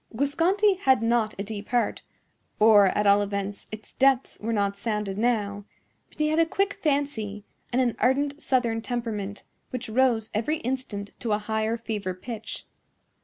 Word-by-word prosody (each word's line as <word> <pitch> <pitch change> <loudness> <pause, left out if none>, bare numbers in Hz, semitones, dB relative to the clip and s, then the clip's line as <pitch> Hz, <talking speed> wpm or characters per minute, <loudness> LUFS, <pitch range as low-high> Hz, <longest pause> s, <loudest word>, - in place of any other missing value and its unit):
Guasconti 355 - +2
had 265 - +3
not 230 -2 +1
a 200 - -3
deep 205 0 -7
heart—or, 220 -3 +2
at 210 +2 0
all 200 0 +6
events, 200 0 -4
its 215 0 -9
depths 270 -1 +2
were 225 +2 -3
not 200 -2 0
sounded 210 -2 -2
now; 205 -3 0 0.5
but - - -22
he 305 0 +1
had 310 +1 +1
a 330 - +5
quick 395 +4 0
fancy, 275 -9 -1 0.3
and 255 +2 +3
an 240 -2 0
ardent 285 +3 +1
southern 235 -4 +1
temperament, 220 -4 -4 0.3
which 250 -2 -4
rose 230 -2 +2
every 235 +9 0
instant 230 -5 -4
to 225 -3 -1
a - - +3
higher 220 +1 -1
fever 210 -5 -4
pitch. 225 +3 -7
225 Hz, 160 wpm, -26 LUFS, 205-260 Hz, 0.5 s, all